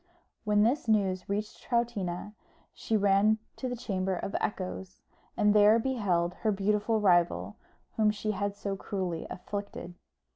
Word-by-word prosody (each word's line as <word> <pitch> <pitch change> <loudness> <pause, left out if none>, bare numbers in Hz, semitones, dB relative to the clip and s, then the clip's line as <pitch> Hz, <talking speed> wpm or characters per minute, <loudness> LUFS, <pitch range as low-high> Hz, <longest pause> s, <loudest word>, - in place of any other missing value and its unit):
When 210 0 +4
this 240 +4 +1
news 195 -4 +1
reached 210 +2 -3
Troutina, 210 -6 -2 0.4
she 220 - -1
ran 205 +2 +4 0.2
to 255 - -3
the 245 - -3
Chamber 190 -5 -2
of 195 +3 -4
Echoes, 190 -1 -4 0.4
and 210 0 +4
there 210 +1 +6
beheld 200 -9 0
her 220 - +2
beautiful 210 +2 +1
rival, 175 -4 +2 0.4
whom 215 -1 +4
she 215 0 -1
had 200 0 -2
so 200 -1 -3
cruelly 185 -4 -4
afflicted. 200 -2 -6
205 Hz, 140 wpm, -29 LUFS, 190-215 Hz, 0.4 s, there